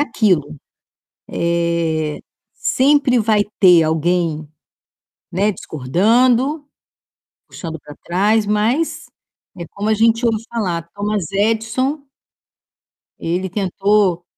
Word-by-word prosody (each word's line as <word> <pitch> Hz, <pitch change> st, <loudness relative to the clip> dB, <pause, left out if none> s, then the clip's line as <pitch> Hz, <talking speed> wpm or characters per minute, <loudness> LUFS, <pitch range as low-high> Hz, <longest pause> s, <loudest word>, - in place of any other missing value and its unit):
aquilo, 190 Hz, -, 0 dB, 0.7 s
eh, 170 Hz, -2 st, -1 dB, 0.3 s
sempre 270 Hz, -2 st, +2 dB
vai 215 Hz, -1 st, +2 dB, 0.2 s
ter 175 Hz, -3 st, +7 dB
alguém, 160 Hz, 0 st, 0 dB, 0.9 s
né, 200 Hz, +4 st, +1 dB
discordando, 235 Hz, -, +1 dB, 0.8 s
puxando 160 Hz, -2 st, -7 dB
pra 150 Hz, -, -12 dB
trás. 205 Hz, +4 st, +1 dB
Mas 225 Hz, +10 st, 0 dB, 0.5 s
é 170 Hz, -, -6 dB
como 205 Hz, +2 st, -3 dB
a -, -, +4 dB
gente 230 Hz, +2 st, +2 dB
ouve 225 Hz, -1 st, 0 dB
falar: 175 Hz, -7 st, -3 dB
Thomas 205 Hz, -3 st, -2 dB
Edison 225 Hz, +7 st, 0 dB, 1.2 s
ele 180 Hz, +3 st, -2 dB
tentou 195 Hz, -1 st, +1 dB
200 Hz, 90 wpm, -18 LUFS, 170-225 Hz, 1.2 s, ter